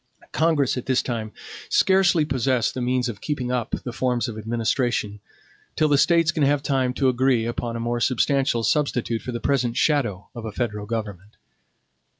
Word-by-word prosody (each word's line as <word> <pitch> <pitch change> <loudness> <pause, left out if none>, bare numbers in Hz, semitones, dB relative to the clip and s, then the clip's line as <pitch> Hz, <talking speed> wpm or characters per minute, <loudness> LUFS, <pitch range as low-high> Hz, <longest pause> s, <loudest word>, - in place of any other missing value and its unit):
Congress 155 -5 +1
at 125 - -5
this 130 -1 +2
time 110 -3 -4 0.4
scarcely 190 -4 +3
possess 130 -3 0
the 130 - -5
means 125 0 0
of 110 -4 -6
keeping 130 -5 -3
up 125 -3 -1
the 125 - -5
forms 125 -1 0
of 115 - -6
administration, 110 -1 -1 0.6
till 155 - +2
the 145 - +3
States 170 0 +4
can 160 - -3
have 145 0 +2
time 130 -3 +1
to 130 +1 0
agree 125 -2 +2
upon 120 0 -3
a - - -3
more 120 +1 -1
substantial 130 0 +1
substitute 125 -3 0
for 125 - -5
the 120 - -4
present 125 -3 0
shadow 120 -11 +1
of 120 -3 -8
a 110 - -5
federal 105 -2 -3
government. 105 -3 -5
125 Hz, 175 wpm, -23 LUFS, 115-140 Hz, 0.6 s, States